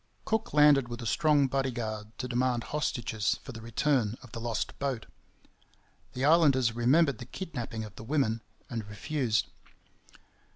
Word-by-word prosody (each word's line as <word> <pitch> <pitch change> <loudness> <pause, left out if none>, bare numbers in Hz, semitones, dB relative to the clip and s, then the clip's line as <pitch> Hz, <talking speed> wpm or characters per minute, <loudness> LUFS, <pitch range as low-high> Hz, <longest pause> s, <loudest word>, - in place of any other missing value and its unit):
Cook 220 0 -1
landed 150 -3 +6
with 120 0 -6
a - - -6
strong 150 +4 +3
bodyguard 120 -5 -3
to 125 - -3
demand 125 -1 0
hostages 120 -8 0
for - - -8
the 115 - -9
return 115 -1 0
of 130 - -13
the 115 - -6
lost 115 -2 -3
boat. 135 -5 -2 1.1
The 130 +2 -1
islanders 140 -7 +5
remembered 130 +3 +3
the 120 - -7
kidnapping 125 -10 -5
of 105 -1 -10
the - - -8
women, 115 -4 0 0.3
and 115 -6 -5
refused. 115 +1 -1
125 Hz, 150 wpm, -29 LUFS, 115-140 Hz, 1.1 s, landed